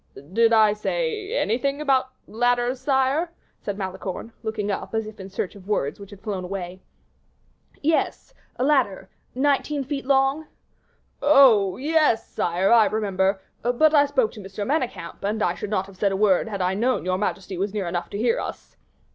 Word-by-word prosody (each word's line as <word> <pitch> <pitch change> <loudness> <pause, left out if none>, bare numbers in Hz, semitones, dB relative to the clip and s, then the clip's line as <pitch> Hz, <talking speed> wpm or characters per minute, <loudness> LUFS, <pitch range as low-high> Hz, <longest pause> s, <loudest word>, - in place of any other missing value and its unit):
"Did 230 +1 +4
I 215 -2 +5
say 440 - -2
anything 275 +6 0
about 270 -3 +2 0.2
ladders, 245 +2 0
sire?" 275 +5 +1 0.3
said 200 -1 -4
Malicorne, 190 +3 -5
looking 215 -2 -2
up, 200 - -4
as 220 -1 0
if 215 -1 -10
in 190 0 -8
search 190 -1 -3
of 200 -2 -14
words 150 -8 -1
which 200 -1 -10
had 200 -2 -13
flown 200 -4 -4
away. 185 0 -6 1.0
"Yes, 320 +10 0 0.2
of 250 - -1
a - - +2
ladder 260 -10 +1 0.3
nineteen 285 +1 +1
feet 275 0 -5
long." 275 +3 +2 0.7
"Oh, 240 -10 +5
yes, 300 -4 +2
sire, 180 +3 0
I 230 -2 +7
remember; 195 -2 0 0.2
but 250 +6 +3
I 290 -1 +5
spoke 260 -6 +1
to - - -11
M. 195 +1 -6
Manicamp, 255 - -3
and 210 +2 -1
I 175 - +2
should 205 +3 -6
not 195 -3 0
have 195 -1 -15
said 200 0 +1
a 195 - -1
word 200 0 +3
had 200 -4 -3
I 180 +1 +1
known 240 +1 0
your 185 0 0
majesty 195 -2 -3
was 195 +3 -2
near 200 -3 -3
enough 175 0 -3
to - - -5
hear 230 +2 +1
us." - - -7
220 Hz, 180 wpm, -24 LUFS, 195-270 Hz, 1.0 s, I